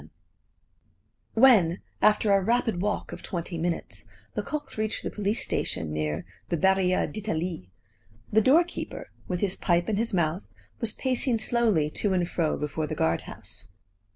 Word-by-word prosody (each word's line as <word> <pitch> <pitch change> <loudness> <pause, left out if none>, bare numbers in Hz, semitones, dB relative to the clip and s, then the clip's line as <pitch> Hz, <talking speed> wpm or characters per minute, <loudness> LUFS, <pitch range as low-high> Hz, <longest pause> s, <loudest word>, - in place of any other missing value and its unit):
VII - - -16 1.3
When, 215 -8 +5 0.2
after 210 -1 +4
a 195 - +4
rapid 225 -2 +1
walk 210 +1 -1
of - - -7
twenty 175 -1 -4
minutes, 165 - -3 0.3
Lecoq 290 +7 -4
reached 215 0 -2
the - - -3
police 205 +1 0
station 80 -1 -1
near 75 +1 -2 0.2
the 170 - 0
Barriere 190 +1 +3
d'Italie, 175 - -3 0.6
the 220 - +6
doorkeeper, 330 +9 +1 0.2
with 180 -1 -2
his 195 -1 0
pipe 175 -1 +1
in 215 - 0
his 230 +2 +1
mouth, 175 0 0 0.3
was 230 -2 -1
pacing 255 -2 +1
slowly 215 -10 +2
to 200 +3 +1
and 180 -2 +1
fro 165 -3 0
before 150 +1 -2
the - - -3
guard 80 +1 +1
house. - - -8
190 Hz, 155 wpm, -27 LUFS, 165-220 Hz, 1.3 s, the